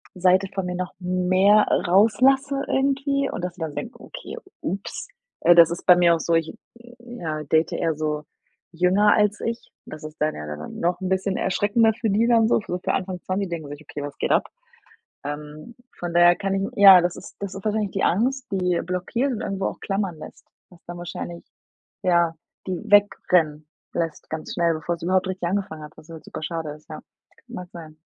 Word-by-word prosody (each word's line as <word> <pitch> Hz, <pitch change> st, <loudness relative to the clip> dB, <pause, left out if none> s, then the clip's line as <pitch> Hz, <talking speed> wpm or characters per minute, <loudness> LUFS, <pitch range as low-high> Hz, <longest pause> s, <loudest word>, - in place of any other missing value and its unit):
Seite 185 Hz, +1 st, +3 dB
von 195 Hz, -2 st, -2 dB
mir 180 Hz, 0 st, -3 dB
noch 180 Hz, 0 st, -4 dB
mehr 185 Hz, +3 st, +3 dB, 0.2 s
rauslasse 265 Hz, +8 st, +3 dB
irgendwie 275 Hz, +1 st, 0 dB
und 180 Hz, -, -5 dB
dass 180 Hz, -, -3 dB
die 180 Hz, -, -14 dB
dann 155 Hz, -2 st, -4 dB
denken: 150 Hz, -, -6 dB
„Okay, -, -, -9 dB, 0.2 s
ups.“ 195 Hz, -, -5 dB, 0.3 s
Äh, 175 Hz, -, +7 dB
das 170 Hz, -1 st, +8 dB
ist 170 Hz, -, -5 dB
bei 180 Hz, -, +8 dB
mir 175 Hz, -1 st, +4 dB
auch -, -, -4 dB
so 170 Hz, -, -1 dB
ich, 165 Hz, -1 st, 0 dB, 0.5 s
ja, 170 Hz, -11 st, -5 dB
date 160 Hz, +2 st, +1 dB
eher 165 Hz, -2 st, 0 dB
so 150 Hz, 0 st, -2 dB, 0.5 s
jünger 185 Hz, +5 st, +3 dB
als 210 Hz, -1 st, +1 dB
ich. 230 Hz, 0 st, -4 dB
Das 155 Hz, 0 st, -10 dB
ist 155 Hz, 0 st, -9 dB
dann 155 Hz, +1 st, +1 dB
ja 75 Hz, -, -7 dB
dann 75 Hz, +1 st, -7 dB
noch 175 Hz, +3 st, 0 dB
'n 185 Hz, -, -2 dB
bisschen 190 Hz, +1 st, 0 dB
erschreckender 220 Hz, +4 st, +2 dB
für 225 Hz, 0 st, -2 dB
die 210 Hz, +4 st, +2 dB
dann 230 Hz, -2 st, +4 dB
so -, -, +3 dB
so 180 Hz, -, -3 dB
für -, -, -2 dB
Anfang 185 Hz, -1 st, -3 dB
20, 190 Hz, +1 st, -2 dB
die -, -, -13 dB
denken 160 Hz, -4 st, -5 dB
sich: 145 Hz, +1 st, -9 dB
„Okay, 145 Hz, 0 st, -7 dB
was 145 Hz, 0 st, -7 dB
geht -, -, -1 dB
ab.“ -, -, +2 dB, 0.8 s
Ähm, 150 Hz, +8 st, -7 dB, 0.2 s
von 175 Hz, -1 st, -4 dB
daher 175 Hz, 0 st, +6 dB
kann 195 Hz, -1 st, -2 dB
ich 195 Hz, 0 st, -1 dB
ja, 195 Hz, -2 st, +9 dB
das 175 Hz, 0 st, -1 dB
ist -, -, -12 dB
das 200 Hz, -1 st, -5 dB
ist 195 Hz, -, -8 dB
wahrscheinlich 215 Hz, -2 st, -1 dB
die 195 Hz, -, -1 dB
Angst, 255 Hz, +7 st, +1 dB
die 180 Hz, -2 st, +1 dB
blockiert 185 Hz, +9 st, -1 dB
und 225 Hz, -, -4 dB
irgendwo 195 Hz, 0 st, -2 dB
auch -, -, -4 dB
klammern 195 Hz, -3 st, -2 dB
lässt, 155 Hz, -, -12 dB, 0.2 s
was 175 Hz, -, -20 dB
dann 175 Hz, 0 st, -7 dB
wahrscheinlich 175 Hz, 0 st, -7 dB, 0.6 s
ja, 170 Hz, -2 st, +2 dB, 0.3 s
die 185 Hz, -2 st, -2 dB
wegrennen 175 Hz, -7 st, +3 dB, 0.3 s
lässt 165 Hz, -2 st, -3 dB
ganz 160 Hz, 0 st, -5 dB
schnell, 170 Hz, -1 st, +2 dB
bevor 160 Hz, +2 st, -3 dB
es 170 Hz, -, -18 dB
überhaupt 185 Hz, +1 st, +1 dB
richtig 185 Hz, -2 st, -3 dB
angefangen 190 Hz, -5 st, -3 dB
hat, 150 Hz, -, -11 dB
was 155 Hz, -, -15 dB
halt 160 Hz, -1 st, -10 dB
super -, -, -7 dB
schade 165 Hz, -1 st, -4 dB
ist, 150 Hz, 0 st, -13 dB
ja. 155 Hz, -, -8 dB, 0.5 s
Mag 180 Hz, -7 st, -8 dB
sein. 155 Hz, -2 st, -11 dB
180 Hz, 205 wpm, -23 LUFS, 165-205 Hz, 0.8 s, ja